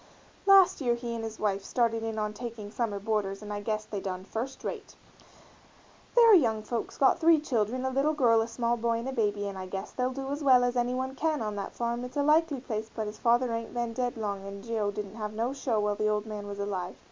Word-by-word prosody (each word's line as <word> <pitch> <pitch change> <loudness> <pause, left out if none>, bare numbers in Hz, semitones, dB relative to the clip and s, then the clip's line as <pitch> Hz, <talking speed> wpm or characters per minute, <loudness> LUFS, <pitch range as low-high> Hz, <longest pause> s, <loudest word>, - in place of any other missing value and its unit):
Last 390 -5 +7
year 240 -3 +2
he 235 0 -5
and 230 -1 -4
his 225 -1 -6
wife 200 -2 0
started 230 0 +1
in 225 -1 -3
on 210 0 -1
taking 225 -2 -7
summer 225 -3 -1
boarders 205 -1 -2
and 210 0 -5
I 205 - -4
guess 215 0 -2
they 205 - -4
done 185 -1 -4
first 235 +7 -5
rate. - - -6 1.2
They're 465 -2 +8
young 225 - +4
folks, 230 +1 -4
got 275 +5 +4
three 330 -1 +6
children, 255 -3 -1
a 260 - 0
little 280 +4 +1
girl 230 -5 +4
a 225 - -1
small 235 0 0
boy 230 0 0
and 230 +3 -4
a - - -4
baby 205 -4 0
and 195 -1 -6
I 185 - -6
guess 195 +2 -5
they'll 250 0 0
do 270 +1 -5
as 290 +1 -3
well 255 -3 +6
as 245 0 0
any 245 +1 +1
one 260 +1 -2
can 310 +2 0
on 210 -1 -3
that 200 - -5
farm, 235 +1 -2
it's 250 +2 -7
a 285 - +2
likely 305 -1 +3
place 220 -3 -4
but 220 - -3
his 210 +1 -7
father 240 +1 +3
ain't 230 +1 -4
been 235 -1 -1
dead 245 0 -2
long 200 -3 -3
and 200 0 -8
Geo. 225 -3 -1
didn't 205 +1 -6
have 210 -1 -4
no 230 +4 -1
show 255 -5 -1
while 210 0 +1
the 215 +1 0
old 210 0 0
man 210 -2 -6
was 200 0 -6
alive. 195 -3 -3
230 Hz, 250 wpm, -29 LUFS, 210-255 Hz, 1.2 s, They're